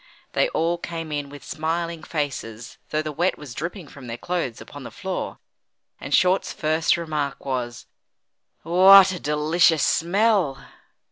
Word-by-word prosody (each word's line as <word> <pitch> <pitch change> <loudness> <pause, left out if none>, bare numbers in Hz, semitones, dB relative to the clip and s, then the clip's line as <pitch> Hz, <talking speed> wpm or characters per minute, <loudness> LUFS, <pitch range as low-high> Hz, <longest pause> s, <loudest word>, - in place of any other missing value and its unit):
They - - +2
all 170 - 0
came 165 -2 -6
in 145 -1 -3
with 145 0 -11
smiling 165 +1 -3
faces 130 -8 -5
though 155 0 -1
the 155 - -4
wet 175 +5 0
was 145 -5 -9
dripping 170 - -6
from 135 -3 -12
their 115 0 -5
clothes 170 -6 -3
upon - - -11
the - - -8
floor, - - -5 0.6
and - - -8
Short's 185 +1 +3
first 160 +2 +1
remark 150 -4 -3
was: 125 -3 -4 0.8
"What 190 +3 +7
a 180 - -5
delicious 155 +2 +2
smell!" 190 -4 +2
160 Hz, 145 wpm, -23 LUFS, 145-175 Hz, 0.8 s, What